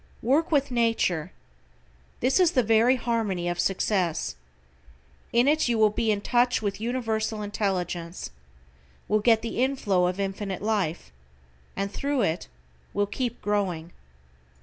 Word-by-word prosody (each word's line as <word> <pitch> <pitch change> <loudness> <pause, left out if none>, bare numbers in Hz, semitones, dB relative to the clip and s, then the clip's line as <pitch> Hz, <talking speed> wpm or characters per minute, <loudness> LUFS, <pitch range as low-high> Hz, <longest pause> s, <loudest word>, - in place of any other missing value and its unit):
WORK 295 +9 +2
WITH 280 -3 +2
NATURE. 225 -8 +1 0.9
This 260 +8 +3
is 355 -2 +4
the 255 - +3
very 225 +3 +4
harmony 225 -8 -1
of 175 0 -2
success. 185 -3 0 1.0
In 240 +3 +3
it 310 0 +3
you 235 -1 +1
will 215 -1 +4
be 225 +1 -1
in 205 -1 +1
touch 245 +3 +2
with 205 -1 -3
Universal 225 -2 -1
Intelligence, 185 -4 -3 0.8
will 215 - +2
get 225 0 +3
the 230 +1 -2
inflow 205 -9 +1
of 185 +2 -3
Infinite 195 -1 -3
Life, 185 - -1 0.6
and 195 0 -2
thru 280 +3 -1
it 165 -2 -1 0.5
will 205 - +2
keep 240 +3 -4
growing. 185 -5 -1
215 Hz, 135 wpm, -26 LUFS, 190-240 Hz, 1.0 s, is